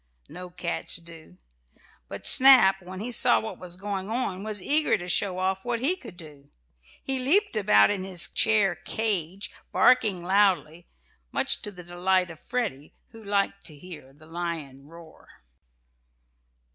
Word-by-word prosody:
No 180 Hz, +1 st, -11 dB
cats 175 Hz, -1 st, -3 dB
do. 165 Hz, -, -12 dB, 0.7 s
But -, -, -10 dB
Snap, 250 Hz, -8 st, +8 dB
when 185 Hz, +1 st, -10 dB
he 240 Hz, +3 st, -5 dB
saw 235 Hz, -, +3 dB
what 220 Hz, -, -9 dB
was 180 Hz, -1 st, -8 dB
going 195 Hz, 0 st, -6 dB
on, 210 Hz, -5 st, -4 dB
was 215 Hz, -1 st, -5 dB
eager 295 Hz, +5 st, +4 dB
to 180 Hz, -2 st, -10 dB
show 185 Hz, +1 st, -1 dB
off 190 Hz, +1 st, -3 dB
what 240 Hz, -1 st, -4 dB
he 290 Hz, +10 st, +2 dB
could 275 Hz, -, -14 dB
do. 145 Hz, -4 st, -13 dB, 0.5 s
He 265 Hz, -1 st, -2 dB
leaped 345 Hz, -, +4 dB
about 105 Hz, -, +3 dB
in 195 Hz, -2 st, -4 dB
his 185 Hz, -2 st, -3 dB
chair 210 Hz, -4 st, +1 dB
"cage," 195 Hz, -1 st, -2 dB, 0.2 s
barking 210 Hz, -8 st, +2 dB
loudly, 185 Hz, -3 st, -1 dB, 0.4 s
much -, -, +1 dB
to -, -, -6 dB
the 180 Hz, -2 st, -13 dB
delight 180 Hz, +1 st, -2 dB
of 160 Hz, -, -14 dB
Freddie 225 Hz, -, -6 dB
who 225 Hz, -1 st, -16 dB
liked 200 Hz, -1 st, -3 dB
to 155 Hz, -, -13 dB
hear 155 Hz, -5 st, -13 dB
the 150 Hz, +3 st, -21 dB
"lion" 160 Hz, -5 st, -7 dB
roar. 165 Hz, -, -18 dB
185 Hz, 155 wpm, -24 LUFS, 170-215 Hz, 0.7 s, Snap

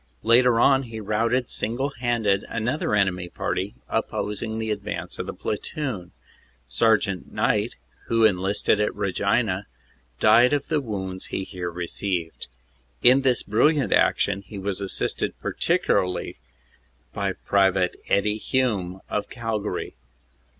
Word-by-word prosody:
Later 120 Hz, +1 st, +5 dB
on 135 Hz, +2 st, +5 dB
he 110 Hz, -1 st, -6 dB
routed 115 Hz, +4 st, 0 dB
single 125 Hz, +6 st, -1 dB
handed 115 Hz, -6 st, 0 dB
another 115 Hz, +1 st, -1 dB
enemy 90 Hz, -3 st, +1 dB
party -, -, -3 dB
opposing 105 Hz, +2 st, -2 dB
the 110 Hz, -1 st, -2 dB
advance 105 Hz, -, -4 dB
of -, -, -3 dB
the -, -, -3 dB
platoon. 125 Hz, -, -4 dB, 0.6 s
Sergt. 100 Hz, -, +2 dB
Knight, -, -, 0 dB, 0.3 s
who 115 Hz, -1 st, +3 dB
enlisted 100 Hz, +1 st, +2 dB
at 105 Hz, -, 0 dB
Regina, 100 Hz, +1 st, 0 dB, 0.5 s
died 120 Hz, +6 st, +6 dB
ot 145 Hz, -, -4 dB
the 155 Hz, -3 st, +1 dB
wounds 95 Hz, -6 st, -5 dB
he 95 Hz, -, -3 dB
here 90 Hz, -2 st, -5 dB
received. 85 Hz, 0 st, -4 dB, 0.6 s
In 130 Hz, +2 st, +7 dB
this 130 Hz, -3 st, +2 dB
brilliant 140 Hz, +8 st, +2 dB
action 100 Hz, -, +2 dB
he 100 Hz, +1 st, -10 dB
was 100 Hz, 0 st, -3 dB
assisted 100 Hz, -, -1 dB
partic -, -, 0 dB
ularly 90 Hz, -1 st, 0 dB, 0.8 s
by -, -, -1 dB
Pte. 95 Hz, -2 st, +2 dB, 0.2 s
Eddie 105 Hz, +2 st, +2 dB
Hume, 100 Hz, -9 st, -1 dB
of 105 Hz, 0 st, -3 dB
Calgary. 110 Hz, -5 st, -3 dB
105 Hz, 125 wpm, -24 LUFS, 95-120 Hz, 0.8 s, In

